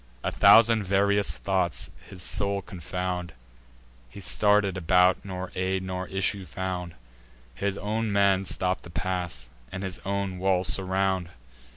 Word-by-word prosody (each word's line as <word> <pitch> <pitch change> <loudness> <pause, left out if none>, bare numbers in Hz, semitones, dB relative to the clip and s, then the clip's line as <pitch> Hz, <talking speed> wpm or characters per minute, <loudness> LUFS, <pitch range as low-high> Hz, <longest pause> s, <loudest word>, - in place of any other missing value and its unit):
A - - -1
thousand 115 -1 +6
various 100 +1 +2
thoughts 95 -5 -1 0.2
his 90 -2 -6
soul 100 -1 0
confound; 90 -1 -4 0.8
He 100 - -11
star'd 105 +1 +2
about, 90 +1 +3
nor 95 -2 -6
aid 95 0 -1
nor 95 0 -4
issue 95 +1 0
found; 90 -3 -4 0.6
His 100 +9 -2
own 110 +1 -2
men 100 -1 +3
stop 90 0 0
the - - -12
pass, 90 -7 -3 0.2
and 95 +1 -5
his 95 -2 -5
own 100 -1 -2
walls 95 -1 +2
surround. 95 -2 0
95 Hz, 135 wpm, -26 LUFS, 90-100 Hz, 0.8 s, thousand